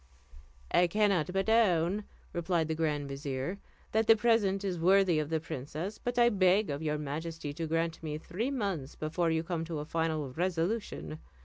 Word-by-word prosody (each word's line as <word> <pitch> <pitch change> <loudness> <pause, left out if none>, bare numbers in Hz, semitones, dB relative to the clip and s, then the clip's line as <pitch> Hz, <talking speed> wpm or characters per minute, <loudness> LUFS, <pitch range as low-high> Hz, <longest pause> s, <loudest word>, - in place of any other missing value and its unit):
"I 175 - +5
cannot 195 -3 +2
but 195 +2 0
own," 205 -3 +3 0.3
replied 170 -1 0
the - - +1
grand 150 -3 -1
vizier, 140 +5 -4 0.3
"that 220 0 +2
the 225 - +8
present 210 -4 +2
is 185 -3 -2
worthy 185 -1 +4
of 150 -1 -2
the 160 -1 +1
princess; 155 +6 -5
but 245 0 -3
I 240 0 +6
beg 190 -2 +3
of 140 +1 -3
your 150 -1 -1
majesty 150 +1 -4
to 165 +1 -4
grant 165 +1 -1
me 155 -2 -4
three 205 - -3
months 195 - -3
before 165 +2 -1
you 160 0 +1
come 165 -1 -2
to 165 -1 -4
a 150 - -4
final 160 -3 -1
resolution. 165 - -2
165 Hz, 180 wpm, -31 LUFS, 155-195 Hz, 0.3 s, the